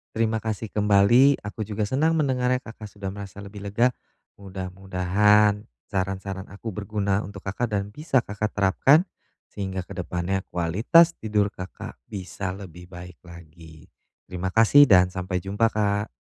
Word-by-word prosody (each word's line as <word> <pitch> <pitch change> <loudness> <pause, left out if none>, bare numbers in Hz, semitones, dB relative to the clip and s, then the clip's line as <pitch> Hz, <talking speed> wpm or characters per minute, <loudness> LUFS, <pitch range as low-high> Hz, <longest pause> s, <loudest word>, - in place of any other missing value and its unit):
Terima 110 0 +1
kasih 110 -1 -4
kembali. 105 +7 +4
Aku 105 +1 -5
juga 105 0 -2
senang 150 +9 +1
mendengarnya, 130 -4 0
Kakak 110 -2 -10
sudah 100 -2 -7
merasa 100 0 -9
lebih 100 0 -9
lega. 115 +5 +2 0.5
Mudah-mudahan 95 +2 +1 0.2
saran-saran 95 0 -4
aku 105 +3 -7
berguna 100 0 -2
untuk 100 -1 -10
Kakak 105 +3 -3
dan 100 0 -3
bisa 135 -1 0
Kakak 105 +1 -4
terapkan, 105 - +4 0.5
sehingga 95 -2 -4
ke - - -17
depannya 90 +2 -2
kualitas 110 - +3
tidur 105 -2 0
Kakak, 90 - -9
bisa 95 -1 -5
lebih 90 -3 -11
baik 90 -1 -11
lagi. 80 -2 -14 0.4
Terima 90 0 -4
kasih 115 +7 +6
dan 90 -3 +6
sampai 90 0 -3
jumpa, 100 +4 +1
Kak. 105 0 0
100 Hz, 140 wpm, -24 LUFS, 95-110 Hz, 0.5 s, kasih